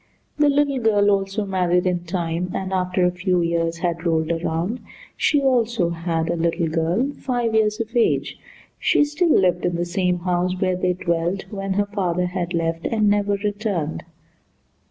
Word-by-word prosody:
The 295 -1 +4
little 285 -1 +2
girl 205 -3 +3
also 195 +1 0
married 180 -2 +1
in 175 -1 -1
time, 170 0 -2
and 190 0 -3
after 180 0 +1
a 180 - +3
few 180 0 0
years 170 0 0
had 170 -1 -2
rolled 160 -1 +1
around, 170 +7 -2 0.4
she 290 -2 +2
also 235 -8 +2
had 165 -1 -2
a - - 0
little 170 0 0
girl 170 - 0
five 240 -3 -1
years 215 0 +2
of 230 +1 -5
age. 235 - +1 0.4
She - - +3
still 300 +4 0
lived 180 -2 +2
in 175 - 0
the 175 +1 -1
same 180 0 0
house 180 0 0
where 185 -1 +1
they 180 0 0
dwelt 175 +1 -1
when 195 -2 -3
her 205 +1 +1
father 180 -4 -1
had 180 -1 -3
left 165 0 -1
and 215 -2 +2
never 205 0 +1
returned. 200 -6 -2
185 Hz, 175 wpm, -22 LUFS, 170-210 Hz, 0.4 s, The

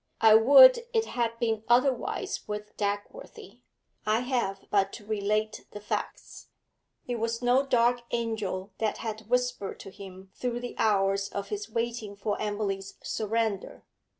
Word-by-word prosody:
I 220 -1 +7
would 380 - +9 0.2
it 450 0 +3
had 230 - -2
been 225 -2 -1
otherwise 255 +1 +1
with 210 0 -6
Dagworthy; 205 - -5 0.4
I 215 +2 +1
have 240 -7 -2
but 195 -1 +2
to 210 - -9
relate 215 +1 -1
the 210 - -6
facts. 210 - -5 0.6
It 245 -1 -3
was 230 +2 -2
no 250 +3 +4
dark 245 -1 +3
angel 215 -4 -3
that 220 -2 0
had 220 -1 -6
whispered 245 -5 -1
to 195 - -10
him 190 -1 -12
through 245 -1 -3
the 245 - -6
hours 195 -2 +2
of 200 - -5
his 415 0 -4
waiting 230 -3 -3
for 205 +1 -2
Emily's 200 -2 -3
surrender. 220 -2 -2
220 Hz, 145 wpm, -28 LUFS, 205-240 Hz, 0.6 s, would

